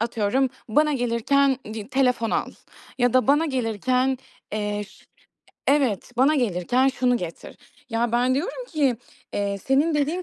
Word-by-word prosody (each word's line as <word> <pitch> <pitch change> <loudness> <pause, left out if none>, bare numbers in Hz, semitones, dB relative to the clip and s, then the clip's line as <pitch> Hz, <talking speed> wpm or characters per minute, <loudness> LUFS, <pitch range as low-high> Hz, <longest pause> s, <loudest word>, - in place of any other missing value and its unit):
atıyorum 235 +3 0 0.2
bana 300 +6 +3
gelirken 260 +2 +2 0.2
di 215 0 -7
telefon 250 -4 +1
al - - -1 0.5
ya 245 -1 +3
da 255 - +4
bana 295 +4 +4
gelirken, 255 +1 0 0.3
eee, 210 -1 -2
ş - - -20 0.6
evet 270 -8 +1
bana 275 +5 +4
gelirken 245 - +1
şunu 250 -1 +1
getir. 170 -6 -7 0.3
Ya 230 +1 0
ben 250 +2 +2
diyorum - - -3
ki, 280 -7 +1 0.4
eee, 200 -1 -1
senin 280 - +1
dediğin 300 +5 0
255 Hz, 140 wpm, -24 LUFS, 225-275 Hz, 0.6 s, da